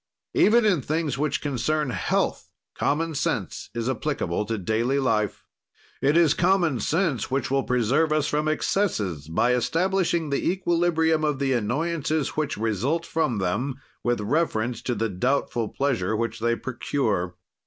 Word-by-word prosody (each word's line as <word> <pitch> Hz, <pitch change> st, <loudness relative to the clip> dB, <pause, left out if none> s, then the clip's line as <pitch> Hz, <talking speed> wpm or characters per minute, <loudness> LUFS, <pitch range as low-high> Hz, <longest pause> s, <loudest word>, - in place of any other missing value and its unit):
Even 230 Hz, +1 st, +5 dB
in 185 Hz, -8 st, +3 dB
things 150 Hz, -1 st, -1 dB
which 150 Hz, -1 st, 0 dB
concern 150 Hz, 0 st, -1 dB
health, -, -, -1 dB, 0.2 s
common 160 Hz, +3 st, 0 dB
sense 145 Hz, -, -2 dB
is 115 Hz, 0 st, -2 dB
applicable 130 Hz, -, -1 dB
to 115 Hz, +1 st, -2 dB
daily 110 Hz, +7 st, 0 dB
life. 110 Hz, -6 st, 0 dB, 0.6 s
It 145 Hz, +4 st, +3 dB
is 165 Hz, -4 st, +5 dB
common 175 Hz, -7 st, +2 dB
sense 155 Hz, -, 0 dB
which 135 Hz, -1 st, -1 dB
will 135 Hz, 0 st, +3 dB
preserve 130 Hz, +6 st, +1 dB
us 155 Hz, -1 st, +2 dB
from 150 Hz, +1 st, 0 dB
excesses, 105 Hz, -, 0 dB
by 115 Hz, +10 st, +2 dB
establishing 170 Hz, +3 st, +1 dB
the 140 Hz, -, 0 dB
equilibrium 170 Hz, -3 st, +1 dB
of 150 Hz, -2 st, +1 dB
the 135 Hz, -1 st, +1 dB
annoyances 150 Hz, +6 st, 0 dB
which 150 Hz, -2 st, -2 dB
result 115 Hz, -, 0 dB
from 155 Hz, -8 st, 0 dB
them, 105 Hz, +9 st, -1 dB, 0.3 s
with 120 Hz, -2 st, 0 dB
reference 120 Hz, -2 st, 0 dB
to 125 Hz, -, -2 dB
the 115 Hz, +1 st, 0 dB
doubtful 115 Hz, +2 st, -1 dB
pleasure 120 Hz, -8 st, 0 dB
which 115 Hz, +2 st, -2 dB
they 115 Hz, +1 st, +1 dB
procure. 115 Hz, -8 st, -2 dB
135 Hz, 145 wpm, -25 LUFS, 115-160 Hz, 0.6 s, Even